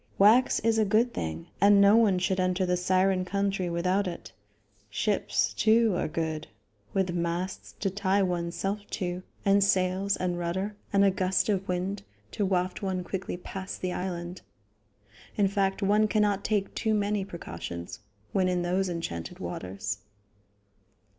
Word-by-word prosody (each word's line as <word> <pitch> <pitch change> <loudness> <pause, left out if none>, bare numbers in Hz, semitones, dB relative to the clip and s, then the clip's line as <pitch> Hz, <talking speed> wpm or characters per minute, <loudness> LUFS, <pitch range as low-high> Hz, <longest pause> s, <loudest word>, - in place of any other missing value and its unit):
Wax 220 +6 +5
is 225 0 +2
a - - +5
good 220 +4 +2
thing, 80 0 -4 0.2
and 200 0 +7
no 200 +1 +7
one 215 -5 +4
should 185 +1 0
enter 185 0 +1
the 180 0 +1
Siren 185 +1 +2
country 195 -1 -1
without 180 +3 +1
it. 175 - -7 0.6
Ships, 200 - 0
too, 220 -2 +3
are - - 0
good, 160 -1 -3 0.4
with 190 -2 0
masts 175 +2 -3
to 195 - 0
tie 200 0 +1
one's 175 -2 -2
self 200 +1 -2
to, 180 -1 -3 0.2
and 200 0 +5
sails 190 0 +2
and 175 -1 -1
rudder, 190 +4 -2 0.2
and 200 0 +4
a 195 - +5
gust 185 +2 +1
of 195 -1 0
wind 185 +3 -2 0.3
to 210 - -2
waft 185 -1 0
one 190 -2 -2
quickly 185 0 -4
past 190 +2 -7
the 185 -1 -2
island. 175 -1 -4 0.9
In 205 -2 +3
fact, 195 0 0
one 210 +2 +4
cannot 205 -2 +1
take 205 -2 0
too 220 -1 0
many 205 -1 0
precautions 85 - -7 0.3
when 185 -2 +2
in 180 -1 0
those 185 +2 0
enchanted 85 - -5
waters. 95 +3 -5
190 Hz, 155 wpm, -28 LUFS, 180-200 Hz, 0.9 s, and